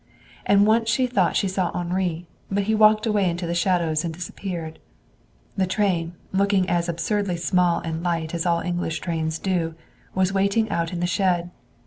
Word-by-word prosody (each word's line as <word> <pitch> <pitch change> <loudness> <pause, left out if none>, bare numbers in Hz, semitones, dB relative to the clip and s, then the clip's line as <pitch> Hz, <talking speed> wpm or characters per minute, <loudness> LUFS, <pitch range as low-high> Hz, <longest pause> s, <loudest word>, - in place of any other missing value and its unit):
And 200 0 +5
once 225 +1 +3
she 255 +2 +2
thought 250 0 +1
she 200 - +2
saw 185 -1 0
Henri, 175 -1 -2 0.2
but 200 +1 0
he 220 +3 0
walked 215 0 +5
away 205 -4 +2
into 175 +1 -3
the 170 - -2
shadows 170 -3 +1
and 170 - -2
disappeared. 170 -1 -6 0.8
The 190 -1 +1
train, 180 -4 0 0.2
looking 195 -1 +2
as 175 -1 0
absurdly 180 +2 -1
small 175 +1 +2
and 165 0 -4
light 170 -2 -2
as 170 -1 -1
all 170 -1 +2
English 175 -2 -2
trains 160 -2 -2
do, 170 -3 -1 0.4
was 190 0 +1
waiting 200 +3 +2
out 165 -1 -1
in 175 -1 -4
the - - +1
shed. 175 -1 0
180 Hz, 175 wpm, -23 LUFS, 170-200 Hz, 0.8 s, And